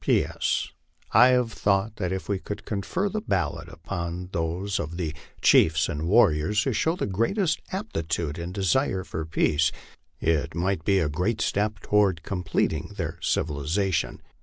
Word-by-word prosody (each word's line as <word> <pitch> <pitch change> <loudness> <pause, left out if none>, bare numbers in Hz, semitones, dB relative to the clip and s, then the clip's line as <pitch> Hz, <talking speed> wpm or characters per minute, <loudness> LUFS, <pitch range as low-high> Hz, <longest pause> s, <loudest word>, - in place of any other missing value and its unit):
P. - - +3
S. - - -1 0.4
I 120 +4 +7
have 125 -3 +2
thought 100 +2 +1
that 90 -2 -2
if 95 0 -3
we 100 -2 -1
could 105 +2 -7
confer 105 - -1
the 215 +2 -2
ballot 90 - -2
upon 85 +1 -5
those 90 +4 -2
of 85 +1 -4
the 80 -4 -2 0.3
chiefs 80 0 +5
and 80 +1 -3
warriors 100 0 +4
who 135 - 0
show 160 +9 +1
the - - -2
greatest 155 - 0
aptitude 85 - -3
and 85 +1 -4
desire 95 - +1
for 80 -3 -4
peace, 80 -1 +2 0.5
it 80 -2 0
might 90 0 0
be 95 +3 +3
a 85 -5 +2
great 90 +10 -1
step 105 0 0
toward 100 -6 +2
completing 90 0 -1
their - - -4
civilization. 80 +6 -1
95 Hz, 160 wpm, -26 LUFS, 80-105 Hz, 0.5 s, I